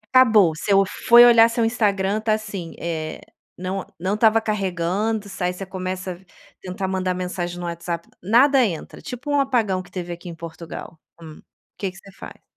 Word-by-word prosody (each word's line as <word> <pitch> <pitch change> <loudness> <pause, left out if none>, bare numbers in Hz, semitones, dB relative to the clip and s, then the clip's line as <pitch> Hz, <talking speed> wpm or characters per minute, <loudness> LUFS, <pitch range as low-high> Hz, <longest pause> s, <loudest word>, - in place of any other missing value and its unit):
Acabou. 215 -10 +6
Você 190 +5 -3 0.4
foi 240 0 +9
olhar 230 -1 +7
seu 230 0 0
Instagram 210 -2 0
tá 220 -1 +1
assim, 205 -6 -5
eh, 160 -2 -4 0.4
não 185 +2 -3 0.2
não 185 +3 -1
estava 220 +1 +4
carregando, 205 +1 -1
s 195 -2 -6
aí 180 - +1
você 180 +2 -7
começa 185 0 -5
a - - -13 0.4
tentar 190 +1 -4
mandar 185 -1 -1
mensagem 180 -1 -4
no 175 - -5
WhatsApp 170 0 -5
nada 255 +8 +5
entra, 175 -9 -4
tipo 250 +4 -6
um 290 - +3
apagão 230 -9 +1
que 180 - -15
teve 175 -2 -5
aqui 175 +1 -9
em 170 - -8
Portugal, 165 0 -9 0.2
hum, 160 -2 -11 0.4
que 195 - -1
que 190 - -17
você 195 0 -15
faz? - - -12
190 Hz, 180 wpm, -22 LUFS, 175-220 Hz, 0.4 s, foi